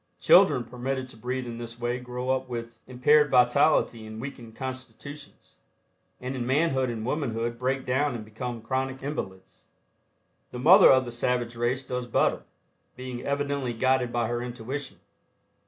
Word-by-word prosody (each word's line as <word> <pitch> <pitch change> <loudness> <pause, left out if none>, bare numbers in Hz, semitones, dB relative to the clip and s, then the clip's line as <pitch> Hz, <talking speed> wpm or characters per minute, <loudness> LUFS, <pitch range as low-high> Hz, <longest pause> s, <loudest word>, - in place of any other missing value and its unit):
Children 125 - +6
permitted 130 +2 -4
to - - -12
breathe 125 +3 -4
in 120 -1 -6
this 120 0 -8
way 120 +1 -1
grow 125 +1 -3
up 130 0 -1
with 115 -1 -6
impaired 145 +4 +4
vitality 125 -2 +3
and 110 0 -8
weakened 120 -4 -8
constitutions, 130 +2 -9 0.6
and 130 +1 -5
in 125 - -2
manhood 135 -2 +2
and 115 -2 -4
womanhood 120 -4 -2
break 130 +1 -1
down 130 +1 +1
and 110 -2 -6
become 115 +1 -6
chronic 130 +2 -2
invalids. 95 -10 -6 0.8
The - - -8
mother 180 +10 +8
of 130 -1 +5
the 120 - -6
savage 120 0 -1
race 120 +3 -1
does 125 -1 -4
better, - - +1 0.5
being 125 -1 -6
evidently 140 -2 -2
guided 130 +1 +1
by 120 -1 0
her 120 0 -2
intuition. 125 +3 -6
125 Hz, 155 wpm, -27 LUFS, 120-130 Hz, 0.8 s, mother